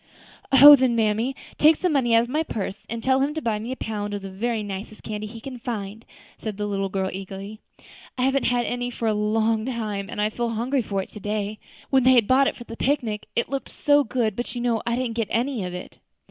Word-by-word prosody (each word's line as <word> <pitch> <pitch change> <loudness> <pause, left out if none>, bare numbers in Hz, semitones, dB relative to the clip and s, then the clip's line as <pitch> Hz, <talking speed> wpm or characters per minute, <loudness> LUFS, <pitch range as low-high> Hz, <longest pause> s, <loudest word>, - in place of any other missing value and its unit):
"Oh! 285 +2 +11
then, 255 -3 +2
mammy, 225 +4 +1 0.2
take 310 +2 +7
some 360 0 0
money 240 -5 +3
out 230 - +5
of 240 - -7
my 300 +4 0
purse, 205 -8 -5
and 230 0 -4
tell 260 0 +3
him 285 +3 0
to 315 - -2
buy 220 -5 -1
me 230 +4 -5
a - - -2
pound 205 -3 -4
of 200 - -6
the 195 - -7
very 220 +3 -2
nicest 205 +1 -7
candy 215 -1 -5
he 225 +2 -9
can 255 +1 -8
find," 220 -3 -5 0.3
said 215 -3 -5
the 210 - -2
little 195 -1 -1
girl, 190 0 -2
eagerly. 195 +2 -7 0.6
"I 250 - 0
haven't 270 +1 +2
had 245 -1 +1
any 245 0 -2
for 235 -2 -3
a 215 - +2
long 215 +1 +1
time, 215 -5 -3
and - - -6
I 210 +1 +1
feel 235 +1 -2
hungry 245 +4 0
for 195 -3 -2
it - - -14
to 210 - -9
day. 210 +1 -3 0.3
What 265 -2 +4
they 260 - +7
had 235 -4 +5
bought 270 +1 +3
for 240 - -9
the 230 - -9
picnic 235 -6 -1 0.2
looked 275 0 -4
so 290 0 +3
good, 225 -4 -1
but 240 +2 -5
you 240 - -3
know 235 -3 +1
I 235 - +1
didn't 240 -2 -2
get 225 -3 0
any 240 -1 -1
of 180 0 -5
it." 180 - -9
230 Hz, 245 wpm, -24 LUFS, 210-255 Hz, 0.6 s, Oh